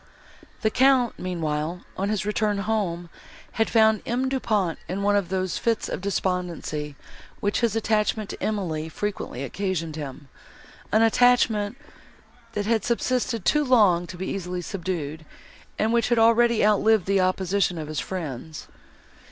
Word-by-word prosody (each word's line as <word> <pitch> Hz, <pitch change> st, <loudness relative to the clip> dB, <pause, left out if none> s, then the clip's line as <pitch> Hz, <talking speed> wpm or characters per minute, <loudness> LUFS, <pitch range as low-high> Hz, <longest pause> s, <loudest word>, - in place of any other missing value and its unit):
The 220 Hz, -, +2 dB
Count 255 Hz, -1 st, +3 dB
meanwhile, 165 Hz, -1 st, -2 dB
on 195 Hz, +2 st, -1 dB
his 210 Hz, -1 st, -1 dB
return 210 Hz, 0 st, 0 dB
home, 195 Hz, -5 st, -2 dB, 0.4 s
had 225 Hz, -, 0 dB
found 220 Hz, -2 st, +4 dB
M. 255 Hz, +2 st, 0 dB
Du 265 Hz, 0 st, -1 dB
Pont 200 Hz, -9 st, 0 dB
in 195 Hz, +2 st, -2 dB
one 205 Hz, 0 st, +3 dB
of 200 Hz, -3 st, 0 dB
those 185 Hz, -1 st, -1 dB
fits 230 Hz, -1 st, 0 dB
of -, -, -4 dB
despondency, 180 Hz, -6 st, -2 dB, 0.4 s
which 205 Hz, 0 st, 0 dB
his 230 Hz, -3 st, +1 dB
attachment 215 Hz, -1 st, 0 dB
to -, -, -9 dB
Emily 165 Hz, -7 st, -2 dB
frequently 175 Hz, -8 st, -4 dB
occasioned 165 Hz, +1 st, -3 dB
him, 145 Hz, -2 st, -7 dB, 0.6 s
an 220 Hz, +1 st, +4 dB
attachment, 225 Hz, -2 st, +3 dB, 0.8 s
that 205 Hz, -1 st, -2 dB
had 220 Hz, -1 st, +1 dB
subsisted 235 Hz, -3 st, -1 dB
too 300 Hz, 0 st, +3 dB
long 205 Hz, -10 st, +4 dB
to 180 Hz, -, -8 dB
be 190 Hz, -, -4 dB
easily 180 Hz, -2 st, -4 dB
subdued, 165 Hz, -5 st, -4 dB, 0.5 s
and 220 Hz, +2 st, +1 dB
which 235 Hz, -1 st, +2 dB
had 240 Hz, -, +3 dB
already 230 Hz, 0 st, +4 dB
outlived 215 Hz, -1 st, +3 dB
the 195 Hz, 0 st, +2 dB
opposition 185 Hz, 0 st, +1 dB
of 155 Hz, -2 st, -5 dB
his 155 Hz, -1 st, -3 dB
friends. 160 Hz, -4 st, -6 dB
200 Hz, 150 wpm, -25 LUFS, 175-220 Hz, 0.8 s, found